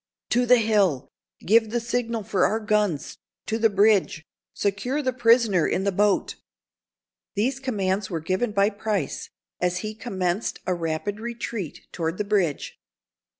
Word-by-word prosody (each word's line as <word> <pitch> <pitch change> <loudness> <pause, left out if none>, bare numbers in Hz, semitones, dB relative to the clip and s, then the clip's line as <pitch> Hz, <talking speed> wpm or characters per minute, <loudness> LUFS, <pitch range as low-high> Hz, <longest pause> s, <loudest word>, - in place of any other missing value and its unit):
"To 245 0 +2
the 250 +1 +7
hill! 200 - +2 0.4
Give 220 +2 +4
the 240 +2 0
signal 235 -1 -2
for 190 -1 0
our 220 - +2
guns—to 210 +1 -2
the 225 0 +4
bridge—secure 200 - 0
the 255 -1 0
prisoner 230 -7 +4
in 190 - 0
the 200 - +1
boat!" 205 +1 +1 1.0
These 250 +6 0
commands 200 -6 -1
were 165 - -2
given 185 +8 -1
by 200 0 +2
Price, 205 -6 -3 0.3
as 180 0 0
he 215 - -4
commenced 195 -3 -2
a 185 - +1
rapid 170 +5 -3
retreat 230 -6 -5
toward 165 +1 -2
the 210 - 0
bridge. 195 -8 -1
205 Hz, 140 wpm, -25 LUFS, 185-230 Hz, 1.0 s, the